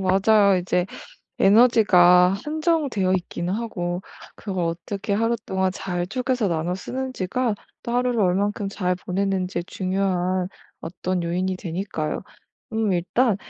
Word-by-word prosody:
맞아요. 195 +1 +4
이제 180 0 0 0.5
에너지가 195 -5 +6
한정되어 300 - 0
있기는 175 -1 -3
하고 180 -5 -3 0.3
그걸 190 -4 -3
어떻게 175 +5 -3
하루 230 +3 +1
동안 190 0 0
잘 175 -2 -3
쪼개서 250 +1 -1
나눠 170 +1 -1
쓰는지가 250 +1 -2 0.3
또 235 - -4
하루를 245 -1 +1
얼만큼 200 +2 +1
잘 180 -2 -1
보내는지 185 -1 -2
중요한 185 -1 -1 0.3
어떤 180 +1 -3
요인이 180 +2 -1
되니까요. 175 -3 -4 0.5
음 220 -2 +1
일단 190 +6 +1
190 Hz, 285 characters per minute, -23 LUFS, 180-220 Hz, 0.5 s, 에너지가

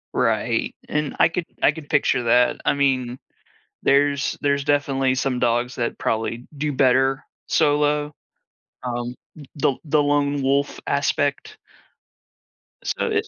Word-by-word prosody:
Right, - - 0
and 150 -2 -2
I - - +6
could 170 0 -3 0.2
I - - +6
could 150 -1 -11
picture 140 -5 +2
that. 120 +1 +3
I - - +3
mean, 130 -3 0 0.7
there's 140 0 +2
there's 140 -1 +1
definitely 135 -3 +1
some 130 -1 -1
dogs 120 +1 0
that 120 -1 -2
probably 115 +2 -2
do 150 0 -1
better 135 +1 +2 0.2
solo, 150 -1 +2 0.7
um, 120 0 -3 0.2
th 145 - -11
the 135 -1 +1
the 150 0 +2
lone 145 -1 +1
wolf 140 +2 0
aspect. 145 - -1 1.3
So - - -2
it 435 0 0
140 Hz, 130 wpm, -22 LUFS, 125-145 Hz, 1.3 s, I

